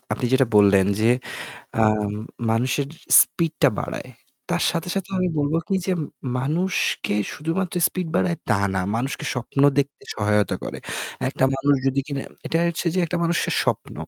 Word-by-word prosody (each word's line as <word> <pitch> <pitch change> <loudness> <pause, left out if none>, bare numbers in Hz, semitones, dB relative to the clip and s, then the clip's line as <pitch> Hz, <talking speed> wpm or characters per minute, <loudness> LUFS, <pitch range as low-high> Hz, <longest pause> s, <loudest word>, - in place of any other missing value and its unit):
আপনি - - -2
যেটা 130 -1 +4
বললেন 100 -2 +6
যে 115 +2 +4 0.7
আম 105 -1 +2 0.4
মানুষের 130 +5 +1 0.3
স্পিড 165 -2 +1
টা - - +7
বাড়ায়। - - -5 0.4
তার - - +1
সাথে, 170 0 -3
সাথে 195 0 -3
আমি 185 0 +1
বলব 145 +2 0
কি 195 - +1
যে 190 - +1 0.5
মানুষকে 165 - 0 0.2
শুধুমাত্র 170 +4 -2
স্পিড 180 -3 -4
বাড়ায় 170 -2 +1
তা 105 - +4 0.2
না। 95 - +1 0.2
মানুষকে 135 +4 -3
স্বপ্ন 125 +3 -3 0.2
দেখতে 140 0 -1
সহায়তা 105 -1 +1
করে। - - -5 0.5
একটা 130 - 0
মানুষ 140 +1 +2
যদি 135 +1 +2
কিনা 140 -2 -3 0.3
এটা 165 - 0
হচ্ছে 170 +1 -3
যে - - 0
একটা 175 - -2
মানুষের 170 0 0
স্বপ্ন। - - -2
140 Hz, 160 wpm, -23 LUFS, 115-170 Hz, 0.7 s, টা